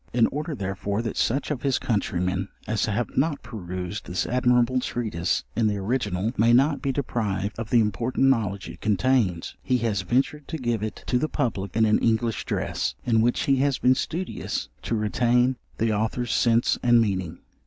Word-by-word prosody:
—In 120 Hz, -1 st, +4 dB
order, 150 Hz, +2 st, -3 dB
therefore, 100 Hz, +1 st, -3 dB
that 115 Hz, -, -3 dB
such 135 Hz, +6 st, 0 dB
of 140 Hz, -, -2 dB
his 135 Hz, -2 st, +1 dB
countrymen 90 Hz, -3 st, -1 dB, 0.2 s
as 110 Hz, 0 st, 0 dB
have 110 Hz, +3 st, -2 dB
not 145 Hz, +2 st, 0 dB
perused 95 Hz, -4 st, -6 dB
this 90 Hz, -, -1 dB
admirable 125 Hz, 0 st, +2 dB
treatise 110 Hz, -9 st, -1 dB
in 110 Hz, 0 st, +2 dB
the 105 Hz, -1 st, 0 dB
original, 105 Hz, -1 st, -1 dB
may 115 Hz, +3 st, +4 dB
not 140 Hz, +4 st, +3 dB
be 135 Hz, -, 0 dB
deprived 110 Hz, -7 st, -2 dB
of 115 Hz, -2 st, -4 dB
the 120 Hz, -, +4 dB
important 115 Hz, +5 st, +1 dB
knowledge 105 Hz, -7 st, +1 dB
it -, -, -10 dB
contains, 105 Hz, -5 st, +1 dB
he 125 Hz, -, +1 dB
has 110 Hz, -5 st, 0 dB
ventured 135 Hz, +9 st, 0 dB
to 160 Hz, -, -4 dB
give 120 Hz, -6 st, -1 dB
it 110 Hz, 0 st, -5 dB
to 125 Hz, -, +1 dB
the 155 Hz, -, -1 dB
public 100 Hz, -6 st, -2 dB
in 110 Hz, 0 st, +4 dB
an 110 Hz, 0 st, +3 dB
English 115 Hz, -1 st, 0 dB
dress, -, -, -2 dB
in 115 Hz, -2 st, +3 dB
which 120 Hz, +2 st, +2 dB
he 135 Hz, -1 st, +2 dB
has 140 Hz, 0 st, +2 dB
been 125 Hz, -, +4 dB
studious 175 Hz, +7 st, -3 dB
to 115 Hz, -, -2 dB
retain 120 Hz, +4 st, +2 dB, 0.2 s
the 110 Hz, 0 st, +1 dB
Author's 110 Hz, +3 st, -1 dB
sense 115 Hz, 0 st, +2 dB
and 120 Hz, -1 st, +5 dB
meaning. 95 Hz, -6 st, -1 dB
115 Hz, 185 wpm, -25 LUFS, 100-125 Hz, 0.2 s, and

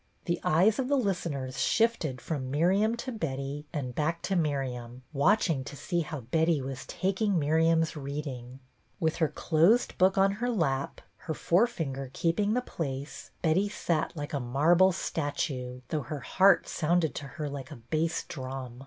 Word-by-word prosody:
The 170 Hz, -1 st, 0 dB
eyes 195 Hz, -, +4 dB
of 260 Hz, -, 0 dB
the 285 Hz, -, +2 dB
listeners 150 Hz, -, -2 dB
shifted 185 Hz, -, +1 dB
from 135 Hz, -5 st, -3 dB
Miriam 190 Hz, -, +2 dB
to 255 Hz, +2 st, -5 dB
Betty 145 Hz, -, -4 dB
and 135 Hz, -6 st, -3 dB
back 160 Hz, +5 st, -1 dB
to 195 Hz, -, 0 dB
Miriam, 130 Hz, -6 st, -2 dB
watch 195 Hz, +11 st, +3 dB
ing 145 Hz, -6 st, 0 dB
to 145 Hz, -, -7 dB
see 175 Hz, +3 st, -1 dB
how 155 Hz, -3 st, -4 dB
Betty 160 Hz, +6 st, +2 dB
was 135 Hz, 0 st, -6 dB
taking 195 Hz, +1 st, 0 dB
Miriam's 160 Hz, +2 st, +2 dB
reading. 135 Hz, -3 st, -6 dB, 0.4 s
With 160 Hz, -3 st, 0 dB
her 160 Hz, -, +3 dB
closed 175 Hz, +12 st, +2 dB
book 190 Hz, +1 st, +4 dB
on 195 Hz, 0 st, +5 dB
her 235 Hz, +5 st, -2 dB
lap, 140 Hz, -, -1 dB, 0.2 s
her 160 Hz, -, -5 dB
forefinger 165 Hz, -, 0 dB
keeping 200 Hz, +6 st, +1 dB
the 250 Hz, -, +2 dB
place, 140 Hz, -, -5 dB
Betty 185 Hz, +5 st, +2 dB
sat 175 Hz, -5 st, -1 dB
like 145 Hz, 0 st, -5 dB
a 140 Hz, -, 0 dB
marble 160 Hz, +9 st, +4 dB
statue, 140 Hz, -7 st, -3 dB
though 155 Hz, -, -1 dB
her 145 Hz, +1 st, -6 dB
heart 190 Hz, +9 st, +4 dB
sounded 165 Hz, -2 st, +1 dB
to 140 Hz, -, -6 dB
her 150 Hz, -, -2 dB
like 140 Hz, -2 st, -6 dB
a 155 Hz, -, -8 dB
bass 155 Hz, +8 st, -1 dB
drum. 130 Hz, -3 st, -6 dB
155 Hz, 165 wpm, -29 LUFS, 135-185 Hz, 0.4 s, on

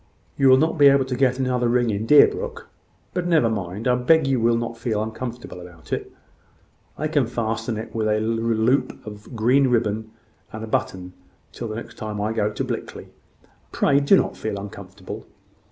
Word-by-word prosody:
"You 135 Hz, -1 st, +4 dB
will 130 Hz, -, +7 dB
not 160 Hz, +3 st, +1 dB
be 145 Hz, -, +8 dB
able 140 Hz, -1 st, +5 dB
to 130 Hz, -1 st, -3 dB
get 130 Hz, 0 st, +2 dB
another 125 Hz, -2 st, 0 dB
ring 120 Hz, -1 st, +2 dB
in 105 Hz, +2 st, -3 dB
Deerbrook. 460 Hz, -, +4 dB, 0.5 s
But 180 Hz, -1 st, -2 dB
never 155 Hz, -10 st, +3 dB
mind. 100 Hz, +2 st, -4 dB
I 125 Hz, -, +4 dB
beg 135 Hz, +5 st, +3 dB
you 135 Hz, -2 st, +1 dB
will 115 Hz, 0 st, +3 dB
not 115 Hz, 0 st, -4 dB
feel 115 Hz, -2 st, -2 dB
uncomfortable 115 Hz, -2 st, -6 dB
about 85 Hz, -2 st, -10 dB
it. -, -, -3 dB, 0.9 s
I 155 Hz, -, -1 dB
can 145 Hz, -6 st, +1 dB
fasten 115 Hz, -1 st, -2 dB
it 110 Hz, +1 st, -7 dB
with 110 Hz, -1 st, -1 dB
a 105 Hz, 0 st, +2 dB
loop 115 Hz, +3 st, 0 dB
of 105 Hz, +3 st, -10 dB
green 125 Hz, +5 st, +3 dB
ribbon 110 Hz, -3 st, 0 dB, 0.4 s
and 110 Hz, 0 st, -7 dB
a -, -, -5 dB
button 90 Hz, -4 st, -3 dB, 0.4 s
till 120 Hz, -, -6 dB
the 110 Hz, -, -5 dB
next 115 Hz, -, -9 dB
time 105 Hz, -1 st, -5 dB
I 105 Hz, +2 st, -1 dB
go 105 Hz, -2 st, 0 dB
to -, -, -3 dB
Blickley. -, -, -6 dB, 0.6 s
Pray 140 Hz, 0 st, +3 dB
do 145 Hz, +7 st, +5 dB
not -, -, 0 dB
feel 105 Hz, -2 st, -4 dB
uncomfortable." 100 Hz, -1 st, -9 dB
115 Hz, 185 wpm, -23 LUFS, 110-130 Hz, 0.9 s, be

